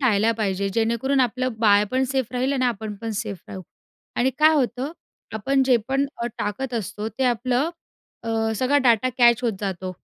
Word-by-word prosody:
टाळल्या 225 -3 +3
पाहिजे. 200 -2 -1
जेणेकरून 235 +4 +1
आपलं 255 0 0
बाळ 210 -2 +5
पण 260 +1 +1
सेफ 260 -3 -1
राहील 255 +2 0
आणि 255 -2 0
आपण 220 -2 -3
पण 225 - -3
सेफ 205 -5 -5
राहू 190 - -7 0.5
आणि 260 +2 +2
काय 310 +1 +6
होतं 265 +2 -1 0.4
आपण 270 +5 +1
जे 250 -2 +5
पण 275 +1 +1
अ, 235 - -3
टाकत 240 +5 -3
असतो 215 0 -3
ते 265 +3 -3
आपलं 250 +5 +1 0.5
अ, 225 -1 0
सगळा 270 +4 +2
डेटा 235 +2 +3
कॅच 240 0 +5
होत 230 - +2
जातो. 185 -2 -4
235 Hz, 180 wpm, -23 LUFS, 215-260 Hz, 0.5 s, काय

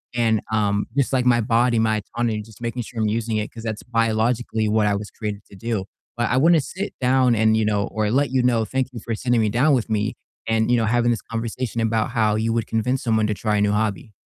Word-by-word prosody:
and, 115 -2 +2
um, 105 -1 +1
just 140 0 +1
like 125 -1 +2
my 120 -1 +4
body, 120 +1 +2
my 110 -1 +2 0.2
autonomy, 115 -3 0
just 105 0 -15
making 120 +1 -3
sure 115 +1 -7
I'm 110 - +1
using 110 0 -1
it 105 - -3
'cause 115 -1 -10
that's 110 -2 -4
biologically 115 -1 0
what 105 0 +2
I 100 - +2
was 105 +1 -6
created 105 -2 -5
to - - -12
do. 110 -2 -3 0.3
But 120 -1 0
I 125 - +2
wanna 165 +4 +5
sit 190 +8 -5
down 125 -1 +3
and, 110 0 +3
you 110 -1 +1
know 105 -1 0
or 110 -1 -1
let 140 +2 +1
you 130 - +2
know, 115 -3 +2
thank 130 +4 -1
you 120 - -7
for 115 - -4
sitting 120 +1 +1
me 110 - +2
down 135 +8 +3
with 120 -2 -2
me 105 -1 -1 0.3
and, 115 +1 +1
you 120 - +4
know, 115 - +1
having 120 +1 +2
this 115 - -1
conversation 115 0 -4
about 110 0 0
how 110 -3 +2
you 110 +1 0
would 115 -1 0
convince 125 +4 -1
someone 110 -3 +2
to 105 - 0
try 105 +1 -1
a - - +1
new 105 0 +2
hobby. 105 0 -1
115 Hz, 255 wpm, -22 LUFS, 110-120 Hz, 0.3 s, wanna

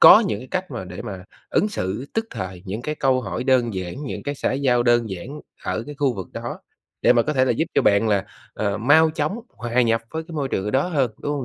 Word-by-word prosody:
có 215 - +11
những 130 -7 -4
cách 185 -3 -2
mà 115 -7 -5
để 90 +3 -7
mà 95 -5 -7 0.3
ứng 210 - +2
xử 105 - -3
tức 225 0 0
thời 90 -1 -6
những 105 +5 -4
cái 150 +2 -2
câu 130 -3 +2
hỏi 125 - -4
đơn 125 -5 +3
giản, 90 -2 -4
những 130 - -5
cái 145 0 -3
xã - - -1
giao 130 -3 +2
đơn 120 -3 +3
giản 125 +12 -6 0.2
ở 110 - -1
cái 145 - -7
khu 135 -4 +2
vực 95 -3 -6
đó, - - -5 0.4
để - - +7
mà 120 - +4
có 150 - -1
thể 130 -2 +3
là - - +1
giúp 160 - +1
cho - - +4
bạn 100 +2 +4
là, 100 -2 +2 0.3
ờ, 100 -1 -1
mau 155 +7 +5
chóng 155 +7 -1
hòa 120 +2 0
nhập 115 -1 +2
với 160 0 -3
cái - - -8
môi 140 -3 -1
trường 95 - -1
ở 105 - -1
đó 135 +7 +2
hơn, 135 -8 +1
đúng 145 - -2
hông 140 -3 -2
125 Hz, 260 wpm, -23 LUFS, 105-145 Hz, 0.4 s, có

